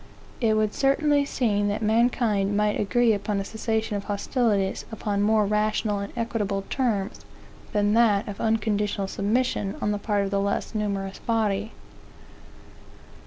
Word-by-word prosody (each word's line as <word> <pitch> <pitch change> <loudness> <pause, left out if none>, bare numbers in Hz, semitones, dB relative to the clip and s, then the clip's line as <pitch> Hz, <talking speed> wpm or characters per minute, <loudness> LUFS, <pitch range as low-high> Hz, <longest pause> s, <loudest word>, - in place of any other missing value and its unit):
It 220 -3 +2
would 215 -1 +1
certainly 285 +1 +2
seem 210 -7 0
that 205 +2 -2
mankind 215 -3 +2
might 210 0 +1
agree 235 +2 +3
upon 205 0 -1
a 195 - -3
cessation 220 0 -2
of 200 - -4
hostilities, 205 -1 0
upon 205 -2 -2
more 215 0 +3
rational 210 0 0
and 200 0 -5
equitable 210 -4 -1
terms 215 -7 -1 0.5
than 205 0 +2
that 220 -3 +3
of 205 - -6
unconditional 210 -2 0
submission 205 0 -1
on 210 - 0
the 205 - -2
part 205 -1 0
of 195 - -3
the 200 - +1
less 200 +3 -2
numerous 200 -2 -3
body. 220 -2 -1
210 Hz, 145 wpm, -25 LUFS, 200-225 Hz, 0.5 s, agree